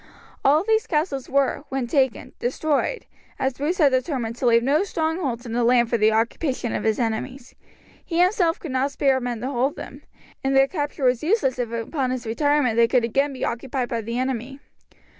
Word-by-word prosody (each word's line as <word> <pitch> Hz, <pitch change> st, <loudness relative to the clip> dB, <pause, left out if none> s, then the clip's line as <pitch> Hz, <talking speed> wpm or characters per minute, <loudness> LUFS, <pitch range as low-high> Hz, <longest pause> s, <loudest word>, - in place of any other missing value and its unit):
All 295 Hz, +3 st, +5 dB
of -, -, -8 dB
these 440 Hz, 0 st, +2 dB
castles 300 Hz, -4 st, -1 dB
were, 280 Hz, 0 st, +1 dB
when 265 Hz, -2 st, -2 dB
taken, 260 Hz, 0 st, 0 dB
destroyed, 295 Hz, -, -1 dB, 0.3 s
as 265 Hz, 0 st, 0 dB
Bruce 315 Hz, +6 st, -1 dB
had 290 Hz, -5 st, +4 dB
determined 255 Hz, -3 st, -1 dB
to 250 Hz, -, 0 dB
leave 235 Hz, 0 st, +4 dB
no 290 Hz, +8 st, +2 dB
strongholds 315 Hz, -9 st, -2 dB
in 235 Hz, -, -6 dB
the 240 Hz, 0 st, +1 dB
land 240 Hz, -1 st, +3 dB
for 235 Hz, -, +3 dB
the 215 Hz, +1 st, +4 dB
occupation 235 Hz, +2 st, -1 dB
of -, -, -2 dB
his 220 Hz, -1 st, +2 dB
enemies. 240 Hz, +3 st, -3 dB, 0.5 s
He 335 Hz, -1 st, -2 dB
himself 360 Hz, -2 st, +2 dB
could 320 Hz, -, -6 dB
not 260 Hz, +2 st, +1 dB
spare 270 Hz, -1 st, +1 dB
men 245 Hz, -2 st, -4 dB
to 260 Hz, +3 st, -3 dB
hold 265 Hz, +2 st, 0 dB
them, -, -, -9 dB, 0.4 s
and 270 Hz, 0 st, +1 dB
their 270 Hz, 0 st, +5 dB
capture 290 Hz, -3 st, -3 dB
was 250 Hz, -1 st, +2 dB
useless 305 Hz, -, +1 dB
if 240 Hz, -2 st, -2 dB
upon 250 Hz, +4 st, -2 dB
his 255 Hz, -1 st, -3 dB
retirement 260 Hz, 0 st, +1 dB
they 235 Hz, 0 st, +5 dB
could 245 Hz, 0 st, +2 dB
again 275 Hz, +5 st, +1 dB
be 260 Hz, -, -3 dB
occupied 245 Hz, +1 st, -3 dB
by 230 Hz, -1 st, -2 dB
the 230 Hz, +2 st, -4 dB
enemy. 260 Hz, +1 st, -3 dB
260 Hz, 200 wpm, -23 LUFS, 240-290 Hz, 0.5 s, All